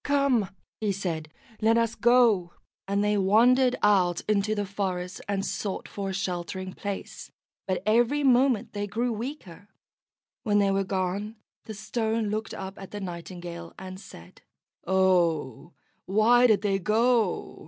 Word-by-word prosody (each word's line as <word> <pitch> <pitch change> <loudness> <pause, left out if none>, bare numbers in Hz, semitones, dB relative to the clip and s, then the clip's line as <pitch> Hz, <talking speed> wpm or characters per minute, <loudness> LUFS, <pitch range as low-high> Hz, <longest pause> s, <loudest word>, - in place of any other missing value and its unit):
"Come," 275 -8 +2 0.3
he 215 -2 0
said, 170 -5 -4 0.3
"let 225 +1 +4
us 230 -1 +1
go;" 235 -8 +3 0.3
and 200 +1 0
they 210 0 +2
wandered 245 +6 +4
out 185 -4 +3
into 215 0 0
the 205 -1 -1
forest, 185 -2 -4
and 195 -1 -1
sought 200 -3 -4
for 200 -1 -5
a - - -3
sheltering 185 0 -4
place, 200 -1 -6 0.4
but 185 -1 -1
every 240 +7 +2
moment 255 -3 +3
they 205 0 -3
grew 235 +5 -1
weaker. 215 - -7 0.7
When 205 -3 +1
they 200 -1 +3
were 195 0 +1
gone, 195 +3 -2 0.3
the 220 - -7
Stone 220 +1 -2
looked 215 +1 -3
up 190 0 -7
at 195 - -9
the 205 - -6
Nightingale, 175 -2 -7
and 185 0 -8
said: 180 - -14 0.5
"Oh, 170 -6 +1 0.3
why 230 +5 +5
did 215 -3 +2
they 195 -2 +1
go? 225 +3 +1
200 Hz, 145 wpm, -27 LUFS, 185-225 Hz, 0.7 s, why